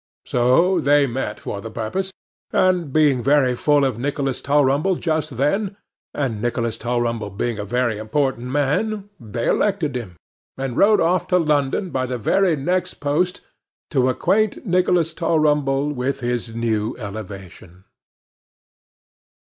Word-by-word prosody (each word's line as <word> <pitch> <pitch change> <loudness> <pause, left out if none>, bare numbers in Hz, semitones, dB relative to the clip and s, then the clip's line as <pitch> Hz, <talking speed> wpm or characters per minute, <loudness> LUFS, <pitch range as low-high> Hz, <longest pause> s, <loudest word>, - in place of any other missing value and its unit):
So, 150 +10 +3
they 145 -1 +4
met 120 -4 -3
for 100 - -5
the 115 - -7
purpose; 185 - -3 0.4
and 180 -5 +2
being 145 -4 +3
very 135 -1 +3
full 145 +2 +3
of 125 -4 -2
Nicholas 135 0 -2
Tulrumble 145 +5 +2
just 155 -6 -2
then, 195 - 0 0.3
and 120 -7 -2
Nicholas 115 -1 -1
Tulrumble 120 -2 -2
being 110 +3 -3
a 105 - -3
very 120 0 0
important 125 +2 -1
man, 195 +10 -1
they 115 0 -4
elected 180 -10 +1
him, 110 -8 -5 0.4
and 130 -2 -3
wrote 210 +6 +4
off 175 +3 +1
to 180 - +3
London 150 +2 0
by 130 -1 -1
the 125 0 -3
very 175 - +2
next 180 +6 -1
post 160 +6 -1 0.5
to 130 -3 +2
acquaint 215 - +1
Nicholas 180 -3 +2
Tulrumble 150 -4 +1
with 135 +1 -2
his 120 -2 -3
new 110 -2 -1
elevation. 100 -4 -9
135 Hz, 135 wpm, -21 LUFS, 120-165 Hz, 0.5 s, they